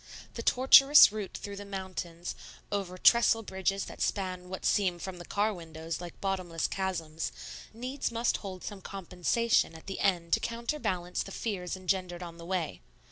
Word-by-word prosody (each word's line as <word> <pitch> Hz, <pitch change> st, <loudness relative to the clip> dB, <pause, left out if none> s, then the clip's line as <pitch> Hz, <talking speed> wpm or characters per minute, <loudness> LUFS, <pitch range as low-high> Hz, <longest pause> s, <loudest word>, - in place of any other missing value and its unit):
The 230 Hz, -, -5 dB
tortuous 270 Hz, +2 st, +8 dB
route 210 Hz, -2 st, -5 dB
through 200 Hz, 0 st, -7 dB
the 205 Hz, -, -6 dB
mountains, 185 Hz, -3 st, -5 dB, 0.4 s
over 195 Hz, -3 st, -2 dB
trestle 225 Hz, +2 st, +5 dB
bridges 195 Hz, 0 st, -1 dB
that -, -, -10 dB
span 185 Hz, -2 st, -2 dB
what 190 Hz, -, -6 dB
seem, 185 Hz, -4 st, +2 dB
from 180 Hz, +1 st, -7 dB
the 175 Hz, -, -8 dB
car 210 Hz, +4 st, +1 dB
windows, 165 Hz, -1 st, -6 dB
like 175 Hz, -1 st, -9 dB
bottomless 185 Hz, -4 st, -2 dB
chasms, 165 Hz, -5 st, -2 dB, 0.4 s
needs 250 Hz, +4 st, -3 dB
must 230 Hz, +1 st, +1 dB
hold 190 Hz, -3 st, -8 dB
some 205 Hz, -2 st, -7 dB
compensation 195 Hz, +2 st, 0 dB
at 160 Hz, -, -12 dB
the 195 Hz, -, -5 dB
end 175 Hz, -3 st, +1 dB
to -, -, +5 dB
counterbalance 230 Hz, -7 st, -2 dB
the 195 Hz, -, -6 dB
fears 190 Hz, -4 st, -3 dB
engendered 185 Hz, -1 st, -2 dB
on 170 Hz, -1 st, -9 dB
the 170 Hz, -, -9 dB
way. 180 Hz, -4 st, -2 dB
190 Hz, 165 wpm, -30 LUFS, 175-205 Hz, 0.4 s, tortuous